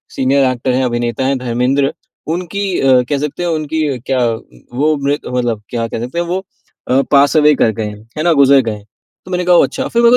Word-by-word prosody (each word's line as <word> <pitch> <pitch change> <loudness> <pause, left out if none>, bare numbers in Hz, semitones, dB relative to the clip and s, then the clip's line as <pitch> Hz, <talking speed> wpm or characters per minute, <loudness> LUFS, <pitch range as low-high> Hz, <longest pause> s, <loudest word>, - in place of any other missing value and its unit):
Senior 135 +1 +2
actor 130 +1 -2
हैं, 130 +1 +1
अभिनेता 120 +1 -1
है 135 +1 +1
धर्मेंद्र 125 +3 0 0.4
उनकी 185 +3 -4 0.2
अ, 130 -2 +4
कह 145 - +1
सकते 150 +5 -3
हैं, 175 - -1
उनकी 155 -3 -1
क्या 130 -2 +2 0.5
वो 155 +3 +2
मृ 140 +1 0
मतलब 120 -3 -1
क्या 115 -1 -2
कहते 120 +7 -5
हैं 175 - -1
वो 180 +2 -2 0.5
अ, 130 +2 +4
पास 140 +2 +4
अवे 150 0 +5
कर 115 - +2
गए 110 - -1
हैं, 105 0 -6 0.2
है 155 - -1
ना 170 0 +4
गुजर 135 0 +5
गए - - -2
हैं।" 105 -1 -14 0.4
तो 185 - -10
मैंने 180 0 -1
कहा 180 0 +5
ओह - - +6
अच्छा! 265 +1 -4
फिर 235 - +1
मेरे 235 0 +6
140 Hz, 225 wpm, -15 LUFS, 125-160 Hz, 0.5 s, ओह